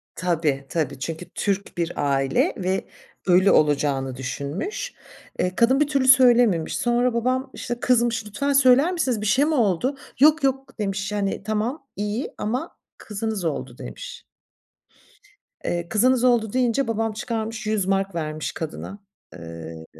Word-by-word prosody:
Tabii, 155 Hz, -6 st, 0 dB
tabii. 155 Hz, -5 st, -2 dB
Çünkü 165 Hz, +4 st, -5 dB
Türk 200 Hz, -2 st, -2 dB
bir 170 Hz, 0 st, -1 dB
aile 135 Hz, -2 st, +1 dB
ve 185 Hz, +1 st, -1 dB, 0.4 s
ölü 185 Hz, +2 st, +5 dB
olacağını 140 Hz, -3 st, +2 dB
düşünmüş. 145 Hz, -, -4 dB, 0.5 s
Eee, 180 Hz, 0 st, 0 dB
kadın 260 Hz, +4 st, +4 dB
bir 300 Hz, -, +3 dB
türlü 275 Hz, -3 st, +1 dB
söylememiş. 240 Hz, -, +5 dB
Sonra 240 Hz, 0 st, +1 dB
babam 255 Hz, +3 st, 0 dB
işte 240 Hz, -1 st, -5 dB
kızmış, 235 Hz, -3 st, +2 dB
“Lütfen 280 Hz, +8 st, -1 dB
söyler 270 Hz, +5 st, +5 dB
misiniz, 255 Hz, -, -1 dB
bir -, -, -3 dB
şey 265 Hz, +8 st, +3 dB
mi 315 Hz, -, 0 dB
oldu?“ 240 Hz, +4 st, +1 dB, 0.2 s
“Yok 305 Hz, +1 st, +5 dB
yok.“ 270 Hz, -3 st, -1 dB
demiş. 200 Hz, 0 st, -2 dB
Hani 200 Hz, -1 st, -2 dB
“Tamam, 220 Hz, +7 st, -2 dB
iyi 210 Hz, +6 st, -3 dB
ama 250 Hz, +10 st, -3 dB, 0.2 s
kızınız 210 Hz, -3 st, -4 dB
oldu.“ 155 Hz, -, -3 dB
demiş. -, -, -9 dB, 1.4 s
Eee, 170 Hz, 0 st, -2 dB
kızınız 250 Hz, +3 st, +3 dB
oldu 235 Hz, -4 st, +3 dB
deyince 255 Hz, 0 st, +1 dB
babam 225 Hz, -1 st, -1 dB
çıkarmış 225 Hz, 0 st, -4 dB
DM100 195 Hz, -3 st, 0 dB
vermiş 155 Hz, -1 st, -3 dB
kadına. 165 Hz, +5 st, -6 dB, 0.3 s
Eee, 80 Hz, -1 st, -9 dB
215 Hz, 140 wpm, -23 LUFS, 170-250 Hz, 1.4 s, ölü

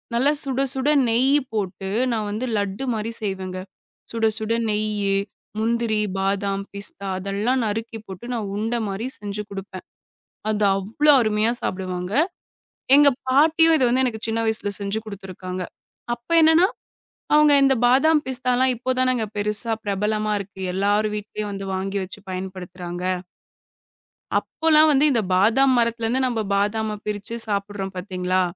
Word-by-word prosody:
நல்லா 265 Hz, +5 st, +3 dB
சுட, 270 Hz, -1 st, -1 dB
சுட 265 Hz, +2 st, 0 dB, 0.2 s
நெய்யி 260 Hz, +5 st, +3 dB
போட்டு, 195 Hz, -2 st, -3 dB, 0.2 s
நான் 215 Hz, -2 st, -1 dB
வந்து 220 Hz, +5 st, -3 dB
லட்டு 200 Hz, +4 st, -2 dB
மாரி 220 Hz, +1 st, -3 dB
செய்வேன்ங்க. 190 Hz, -3 st, -4 dB, 0.5 s
சுட 230 Hz, -1 st, 0 dB
சுட 220 Hz, +1 st, -1 dB, 0.2 s
நெய்யி, 210 Hz, -2 st, 0 dB, 0.5 s
முந்திரி, 225 Hz, -1 st, 0 dB, 0.2 s
பாதாம், 195 Hz, 0 st, -1 dB
பிஸ்தா 200 Hz, 0 st, -4 dB
அதெல்லாம் 205 Hz, +7 st, 0 dB
நறுக்கி 225 Hz, +1 st, -3 dB
போட்டு 190 Hz, +4 st, -9 dB
நான் 215 Hz, -4 st, -3 dB
உண்ட 225 Hz, +3 st, -1 dB
மாரி 200 Hz, +5 st, -4 dB
செஞ்சு 210 Hz, 0 st, -5 dB
குடுப்பேன். 195 Hz, -1 st, -8 dB, 0.7 s
அது 210 Hz, -1 st, +1 dB
அவ்ளோ 230 Hz, +10 st, +3 dB
அருமையா 215 Hz, +1 st, +1 dB
சாப்பிடுவாங்க. 185 Hz, 0 st, -3 dB, 0.8 s
எங்க 290 Hz, 0 st, +7 dB, 0.2 s
பாட்டியும் 320 Hz, +4 st, +5 dB
இத 265 Hz, -, +2 dB
வந்து 255 Hz, +2 st, +2 dB
எனக்குச் 225 Hz, -3 st, -3 dB
சின்ன 225 Hz, +1 st, 0 dB
வயசுல 220 Hz, -2 st, 0 dB
செஞ்சு 200 Hz, +2 st, -2 dB
குடுத்திருக்காங்க. 185 Hz, -2 st, -6 dB, 0.5 s
அப்ப 240 Hz, +7 st, -23 dB
என்னன்னா, 325 Hz, +4 st, +6 dB, 0.7 s
அவங்க 300 Hz, -1 st, +6 dB
இந்த 270 Hz, -1 st, +4 dB
பாதாம், 300 Hz, +4 st, +4 dB
பிஸ்தா 255 Hz, -1 st, -1 dB
எல்லாம் 255 Hz, 0 st, +3 dB
இப்போதானே 255 Hz, +1 st, +1 dB, 0.2 s
பெருசா 210 Hz, +3 st, -1 dB
பிரபலமா 210 Hz, +1 st, 0 dB
இருக்கு, 195 Hz, -1 st, -9 dB
எல்லாரு 205 Hz, +2 st, +2 dB
வீட்டுலயும் 210 Hz, 0 st, -5 dB
வந்து 195 Hz, 0 st, -5 dB
வாங்கி 195 Hz, +1 st, -2 dB
வச்சு 190 Hz, +2 st, -9 dB
பயன்படுத்துறாங்க. 180 Hz, -1 st, -6 dB, 1.4 s
அப்பல்லாம் 315 Hz, -1 st, +3 dB
வந்து 280 Hz, +1 st, +4 dB
இந்த 240 Hz, -4 st, +2 dB
பாதாம் 230 Hz, +9 st, +4 dB
மரத்திலேந்து 230 Hz, +1 st, +1 dB
நம்ம 240 Hz, -3 st, -1 dB
பாதாம 210 Hz, +2 st, 0 dB
பிரிச்சு 210 Hz, +2 st, -4 dB
சாப்பிடுறோம் 200 Hz, -1 st, -3 dB
பாத்தீங்களா? 185 Hz, 0 st, -1 dB
215 Hz, 135 wpm, -23 LUFS, 195-245 Hz, 1.4 s, எங்க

